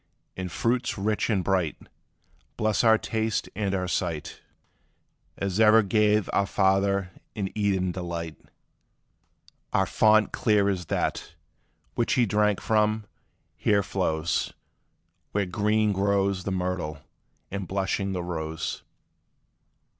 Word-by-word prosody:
And 90 -1 -5
fruits 120 +5 0
rich 105 +3 0
and 100 -5 +1
bright 90 -5 0 0.8
Bless 110 +1 +1
our 110 -1 +6
taste 110 0 -2
and 100 -1 -1
our 90 -1 -1
sight 85 -4 -3 1.0
As 100 0 -2
e'er 110 0 +7
gave 105 0 +2
our 100 - +2
father 95 0 +2 0.2
in 100 -3 -3
Eden 95 -3 +1
delight: 85 -3 -5 1.4
Our - - +2
fount 110 0 +4
clear 105 -2 +2
as 90 -3 -2
that, - - -2 0.6
which 120 - 0
he 125 - +3
drank 105 -1 +2
from, 110 0 +1 0.5
here 100 -1 +2
flows; 85 -4 -1 0.8
Where 100 -1 +1
green 105 +3 +1
grows 100 -1 +1
the 100 - -2
myrtle, 90 -4 -2 0.5
and 100 -2 -4
blushing 95 +1 -1
the 90 -2 -3
rose. 80 -2 -4
100 Hz, 115 wpm, -26 LUFS, 90-105 Hz, 1.4 s, e'er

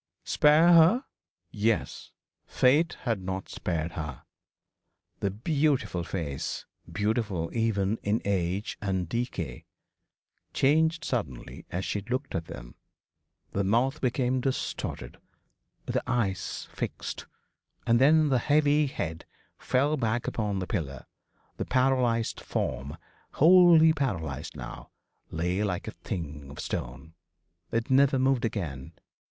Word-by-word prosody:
Spare 155 +3 +5
her 170 - +6 0.5
yes. 110 +1 -1 0.4
Fate 150 +6 +3
had 115 -6 -1
not 95 +1 -4
spared 85 -1 -3
her. 75 -5 -6 1.0
The 100 - 0
beautiful 135 - 0
face 80 -7 -4 0.3
beautiful 105 -5 -1
even 110 -2 +1
in 105 +2 0
age 95 +1 -1
and 95 -3 -1
decay 90 - -4 0.9
changed 160 +3 +3
suddenly 75 - -4
as 90 +2 -3
she 105 - -2
looked 130 +7 -3
at 85 - -2
them - - -9 0.8
the 100 - 0
mouth 120 +9 +1
became 125 0 +1
distorted, 130 - -3 0.7
the - - -1
eyes 100 -6 -1
fixed: - - -5 0.6
and 115 +1 +3
then 155 +2 +5
the 130 -2 +3
heavy 150 +2 +3
head 80 - -5 0.3
fell 145 +4 +1
back 120 -1 -1
upon 105 -3 -2
the 95 - -2
pillow 75 - -4 0.5
the - - -3
paralysed 125 -3 +1
form, 70 +4 -3 0.4
wholly 165 -1 +7
paralysed 80 - -3
now, - - -8 0.4
lay 90 +5 -1
like 95 -4 -2
a - - -3
thing 75 -6 -6
of 70 - -10
stone. 60 +7 -5 0.6
It 115 +2 -1
never 135 0 +5
moved 130 -2 +2
again. 80 - -4
110 Hz, 115 wpm, -28 LUFS, 85-135 Hz, 1.0 s, wholly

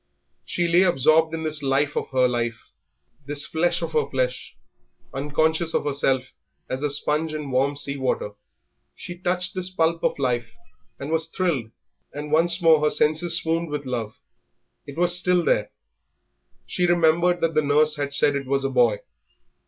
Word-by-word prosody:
She 175 -1 -2
lay 170 +2 +4
absorbed 160 -2 +3
in 160 0 -4
this 155 -1 -1
life 140 +1 0
of - - -3
her 130 -1 +2
life, 120 -2 -4 0.6
this 145 0 -1
flesh 170 +2 0
of - - -4
her 460 -1 0
flesh, - - -3 0.6
unconscious 160 +4 0
of - - 0
herself 135 -2 -1 0.3
as 130 - -4
a 150 - 0
sponge 150 +2 -1
in 150 -3 -5
warm 135 +3 +1
sea 140 0 -3
water. 130 -5 -2 0.6
She 175 - -8
touched 180 0 -1
this 185 -1 -2
pulp 165 -2 0
of - - 0
life, 120 -4 -2 0.4
and 140 +3 -6
was 160 0 +1
thrilled, 165 -10 -2 0.4
and 150 +1 -7
once 170 +3 +3
more 160 -2 +5
her 150 - +3
senses 160 +4 +2
swooned 165 -1 -2
with 145 -1 -4
love; 115 -4 -4 0.7
it 140 - -10
was 175 0 +3
still 180 -1 +2
there. 105 0 +1 1.0
She 180 - -1
remembered 175 +1 +2
that 165 0 0
the 155 - +3
nurse 150 +1 +2
had 140 -1 -3
said 145 0 +4
it 140 -1 -4
was 135 0 0
a 135 - -1
boy. 120 -5 +2
150 Hz, 170 wpm, -23 LUFS, 140-170 Hz, 1.0 s, more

